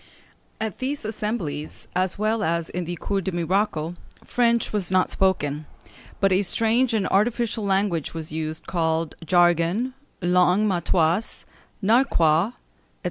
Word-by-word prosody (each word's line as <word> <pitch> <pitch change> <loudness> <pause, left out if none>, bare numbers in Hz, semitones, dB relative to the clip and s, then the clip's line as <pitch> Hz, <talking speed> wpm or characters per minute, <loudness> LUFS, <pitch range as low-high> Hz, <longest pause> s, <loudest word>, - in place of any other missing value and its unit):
] - - -37
At 220 -4 -4
these 270 -1 -3
assemblies, 210 -9 -4
as 185 0 0
well 215 +2 0
as 170 -3 -1
in 180 -1 -3
the 175 +1 -4
Cours 195 +3 -2
des 190 - -3
Miracles, 175 -1 0 0.3
French 235 -2 +1
was 200 -4 -1
not 185 0 +2
spoken, 150 -6 0 0.5
but 195 -1 +3
a 185 +1 +4
strange 230 +5 +1
and 205 -3 +1
artificial 225 +2 +1
language 195 -5 0
was 160 -1 -5
used 155 0 -4
called 160 -2 0
jargon, 175 +8 +2 0.3
langue 180 +3 +3
matoise, 175 +1 +1 0.4
narquois, 195 - +3
&c. - - -30
185 Hz, 135 wpm, -24 LUFS, 165-215 Hz, 0.5 s, a